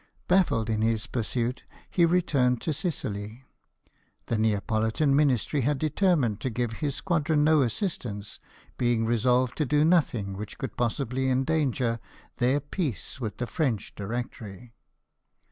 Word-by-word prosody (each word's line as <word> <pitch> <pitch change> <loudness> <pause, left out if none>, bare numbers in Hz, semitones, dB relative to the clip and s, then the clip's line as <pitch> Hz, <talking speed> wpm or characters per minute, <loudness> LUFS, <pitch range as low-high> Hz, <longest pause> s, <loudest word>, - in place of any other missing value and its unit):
Baffled 180 - +3
in 110 -1 0
his 110 0 +1
pursuit, 120 +1 -2 0.2
he 170 - +3
returned 140 -8 +2
to 160 - -1
Sicily. 110 - -4 0.8
The 115 - -1
Neapolitan 110 +6 +1
Ministry 140 0 +2
had 145 +3 +1
determined 150 - +1
to. 130 - -2
give 120 0 -2
his 140 +4 -3
squadron 160 -3 +1
no 155 -1 +5
assistance, 115 - -3 0.4
being 120 -2 +2
resolved 125 +2 +2
to 150 - +1
do 150 +3 +3
nothing 125 - +2
which 105 +1 -7
could - - -5
possibly 130 +2 -1
endanger 130 -3 +1 0.4
their 130 +4 +2
peace 145 - -4
with 110 -5 -4
the 125 - -2
French 120 -3 -2
Directory. 115 +1 -6
125 Hz, 130 wpm, -27 LUFS, 110-150 Hz, 0.8 s, no